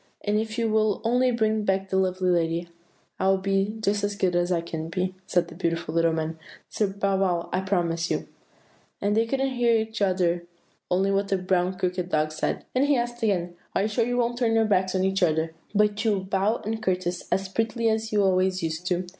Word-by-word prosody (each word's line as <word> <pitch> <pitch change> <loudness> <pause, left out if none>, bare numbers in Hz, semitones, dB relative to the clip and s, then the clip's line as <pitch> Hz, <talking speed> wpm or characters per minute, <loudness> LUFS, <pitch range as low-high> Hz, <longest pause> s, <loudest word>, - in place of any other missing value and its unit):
"'And 210 0 +2
if 220 +1 -4
you 230 -1 +1
will 215 -2 +2
only 250 +3 +3
bring 220 -2 +1
back 195 -1 0
that - - 0
lovely 185 -1 +1
lady 170 0 0 0.5
I 190 - +1
will 195 0 +4
be 195 +2 0
just 205 -1 0
as 205 0 -1
good 185 -3 +1
as 175 +1 +1
I 175 - +2
can 165 -1 -5
be,' 185 +2 -1
said 175 - +1
the - - -11
beautiful 165 -2 -2
little 165 0 +3
man; 160 0 -3 0.3
'Sir 210 - 0
Bow 195 0 0
wow, 180 -3 0
I 185 - +1
promise 170 -3 0
you.' - - -2 0.7
And 205 +1 +1
they 225 +1 +2
couldn't 270 +2 0
hear 235 -2 +3
each 220 0 -4
other, 175 -3 +1 0.4
only 190 +2 +2
what 200 0 +1
the 195 - +1
brown 185 0 0
crockery 180 -1 -1
dog 155 -3 0
said; 155 - -2
and 255 +2 +3
he 285 -2 +3
asked 240 0 -3
again, 180 -5 0 0.2
'Are - - +2
you - - +1
sure 220 +2 +1
you 245 +1 -1
won't 240 0 0
turn 230 -2 +2
your 225 0 +4
backs 190 -3 +1
on 185 - +1
each 190 0 +1
other, 160 -1 +1 0.2
but 210 +1 +2
you 220 -2 +3
will 190 -2 -2
bow 195 +4 0
and 220 +1 -2
courtesy 180 -3 -1
as 195 0 +1
prettily 225 +3 -1
as 220 0 0
you 205 -1 +3
always 185 -1 +2
used 160 +2 -3
to? 180 -1 -1
195 Hz, 225 wpm, -26 LUFS, 180-220 Hz, 0.7 s, will